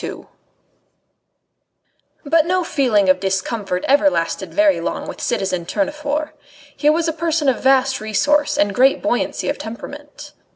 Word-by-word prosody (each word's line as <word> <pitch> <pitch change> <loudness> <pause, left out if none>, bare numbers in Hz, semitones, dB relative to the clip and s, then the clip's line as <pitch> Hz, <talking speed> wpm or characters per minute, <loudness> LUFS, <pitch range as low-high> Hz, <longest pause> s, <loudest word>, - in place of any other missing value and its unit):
II - - -7 2.0
But 320 +2 +2
no 365 0 +1
feeling 240 - +1
of 185 - +4
discomfort 190 0 -2
ever 290 +2 +4
lasted 165 -11 -3
very 305 -1 +2
long - - -4
with - - -8
citizen 195 -6 -1
Tournefort. 300 0 -2 0.4
He 295 - +2
was 325 +2 +1
a 325 - -1
person 325 -2 -1
of 265 - +1
vast 265 -1 +2
resource 290 +8 +1
and 200 0 +1
great 265 +5 +3
buoyancy - - -1
of - - -2
temperament. 220 +1 -9
275 Hz, 140 wpm, -19 LUFS, 210-300 Hz, 2.0 s, of